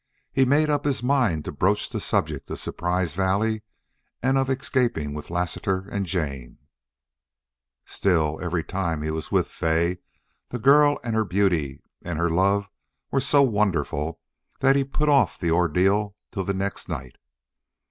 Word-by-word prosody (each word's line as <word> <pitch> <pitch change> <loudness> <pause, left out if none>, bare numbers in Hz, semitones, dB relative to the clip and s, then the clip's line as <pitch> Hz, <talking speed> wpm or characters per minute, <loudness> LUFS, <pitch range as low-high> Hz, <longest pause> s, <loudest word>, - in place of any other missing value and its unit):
He 135 - +4
made 145 +4 +3
up 145 -1 0
his 140 -4 -1
mind 125 - +1
to - - -4
broach 95 +8 +1
the - - -4
subject - - -1
of - - -4
Surprise 90 -2 -2
Valley 100 +5 0 0.6
and 130 +2 +2
of 135 -1 +1
escaping 125 - 0
with 75 0 -7
Lassiter 90 +2 -2
and 100 -2 -2
Jane; 70 -9 -3 1.3
still, 80 -5 0
every 85 -2 -1
time 85 -5 -2
he 80 - -2
was 80 0 -5
with - - +2
Fay 85 +2 0 0.5
the 125 - -4
girl 145 +4 +5
and 115 -2 -2
her 110 - +3
beauty 90 -9 0 0.2
and 85 -3 -4
her 85 0 +1
love 100 +4 +2 0.4
were 135 - +2
so 140 +1 +4
wonderful 85 - 0 0.4
that 135 0 +4
he 140 - +3
put 145 +3 -1
off 145 -2 +3
the 85 -2 -1
ordeal 95 +5 +2 0.2
till 95 -2 -3
the 100 - -1
next 100 0 -3
night. 65 -7 -6
95 Hz, 160 wpm, -24 LUFS, 80-120 Hz, 1.3 s, girl